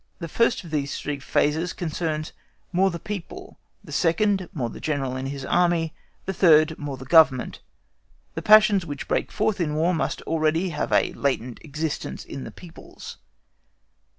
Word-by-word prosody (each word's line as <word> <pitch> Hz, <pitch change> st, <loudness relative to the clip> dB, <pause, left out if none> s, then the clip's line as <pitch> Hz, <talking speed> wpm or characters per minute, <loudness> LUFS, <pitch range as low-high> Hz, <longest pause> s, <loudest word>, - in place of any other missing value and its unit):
The 170 Hz, -, -6 dB
first 230 Hz, +7 st, +1 dB
of 170 Hz, -, -11 dB
these 145 Hz, -2 st, -2 dB
three 145 Hz, -1 st, -4 dB
phases 155 Hz, +5 st, 0 dB
concerns 155 Hz, -2 st, -3 dB, 0.4 s
more 190 Hz, +2 st, +3 dB
the 170 Hz, -, -4 dB
people 210 Hz, -, -8 dB, 0.2 s
the -, -, -12 dB
second, 190 Hz, +2 st, +1 dB
more 130 Hz, -7 st, -2 dB
the -, -, -9 dB
General 135 Hz, -4 st, -2 dB
and 130 Hz, +1 st, -4 dB
his 135 Hz, -1 st, -5 dB
Army; 170 Hz, -2 st, +1 dB, 0.3 s
the 190 Hz, -, -2 dB
third, 160 Hz, -4 st, +5 dB
more 145 Hz, -3 st, -5 dB
the 130 Hz, -, -10 dB
Government. 155 Hz, -4 st, +4 dB, 0.7 s
The -, -, -4 dB
passions 215 Hz, -2 st, +6 dB
which 145 Hz, -4 st, -6 dB
break -, -, -1 dB
forth 215 Hz, -2 st, 0 dB
in 150 Hz, -3 st, -1 dB
War 165 Hz, +4 st, +2 dB
must 145 Hz, -5 st, -2 dB
already 165 Hz, +3 st, 0 dB
have 165 Hz, -, -3 dB
a -, -, +2 dB
latent 130 Hz, -3 st, -2 dB
existence 155 Hz, +1 st, -4 dB
in 135 Hz, -, -7 dB
the -, -, -8 dB
peoples. 175 Hz, -3 st, -12 dB
160 Hz, 165 wpm, -24 LUFS, 145-180 Hz, 0.7 s, passions